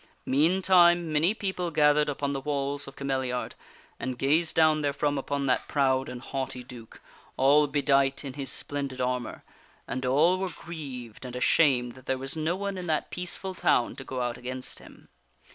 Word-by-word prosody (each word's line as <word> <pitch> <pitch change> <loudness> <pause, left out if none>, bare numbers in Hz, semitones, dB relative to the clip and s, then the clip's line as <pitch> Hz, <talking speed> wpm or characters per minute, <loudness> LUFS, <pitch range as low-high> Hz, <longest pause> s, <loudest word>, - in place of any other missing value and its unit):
Meantime 175 +2 +4
many 155 +5 +3
people 190 -4 -2
gathered 150 -1 +3
upon 140 0 -2
the 135 - -3
walls 140 0 -2
of 135 - -10
Cameliard 130 -2 -2 0.5
and 130 -2 -4
gazed 155 +5 +2
down 155 -1 +4
therefrom 145 0 0
upon 140 0 -2
that 125 -4 +1
proud 130 -2 +1
and 125 0 -8
haughty 130 -2 -4
duke, 120 -2 -12 0.4
all 145 +3 +5
bedight 140 -1 +1
in 135 - -5
his 140 0 -2
splendid 140 -2 -3
armor, 125 -2 -2 0.4
and 130 - -3
all 155 +8 +3
were 190 -1 -1
grieved 135 -12 -8
and 125 -1 -7
ashamed 125 -2 +3
that 130 0 -16
there 130 - 0
was 135 +3 -4
no 160 +2 0
one 200 0 -4
in 180 - -6
that 155 -1 -1
peaceful 180 +2 -4
town 120 -9 +1
to 135 - -8
go 130 -1 -4
out 120 -1 -2
against 130 +1 -6
him. - - -16
140 Hz, 175 wpm, -27 LUFS, 130-155 Hz, 0.5 s, all